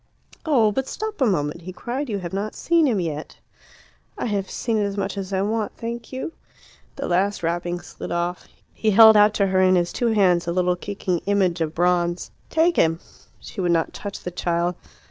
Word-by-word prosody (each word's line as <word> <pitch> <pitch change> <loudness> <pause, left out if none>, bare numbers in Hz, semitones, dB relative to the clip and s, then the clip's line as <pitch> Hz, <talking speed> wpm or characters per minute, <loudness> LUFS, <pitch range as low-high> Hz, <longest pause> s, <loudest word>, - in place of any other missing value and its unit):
"Oh, 235 -8 +4
but 265 +5 -2
stop 435 -6 -5
a 260 - +5
moment!" 170 -4 -1
he 180 +2 -7
cried. 250 +8 -4
"You 205 - -1
have 180 -2 -6
not 205 +2 -3
seen 335 -2 +2
him 225 -6 +1
yet." 155 -3 -4 0.8
"I - - -3
have 200 -4 -2
seen 225 -2 -1
as 200 -1 -1
much 195 +1 -2
as 195 -1 -5
I 190 0 +1
want, 215 +1 -2
thank 235 0 -6
you." 260 +5 -5 0.6
The - - -4
last 190 +2 0
wrapping 175 +1 -1
slid - - -8
off. 175 +1 -2 0.3
He 220 - 0
held 220 +1 +8
out 210 0 +5
to 200 - +3
her 190 -1 +2
in 185 0 +5
his 175 -1 +1
two 240 - 0
hands 185 -6 +3
a - - 0
little 180 0 +1
kicking 180 -1 -3
image 185 -4 +1
of 160 -1 -2
bronze. 175 0 +1 0.2
"Take 335 +2 +2
him!" 165 0 +3 0.4
She - - -7
would 175 -1 +2
not 165 -1 0
touch 200 -1 -7
the 180 - -5
child. 175 0 0
195 Hz, 205 wpm, -23 LUFS, 175-220 Hz, 0.8 s, held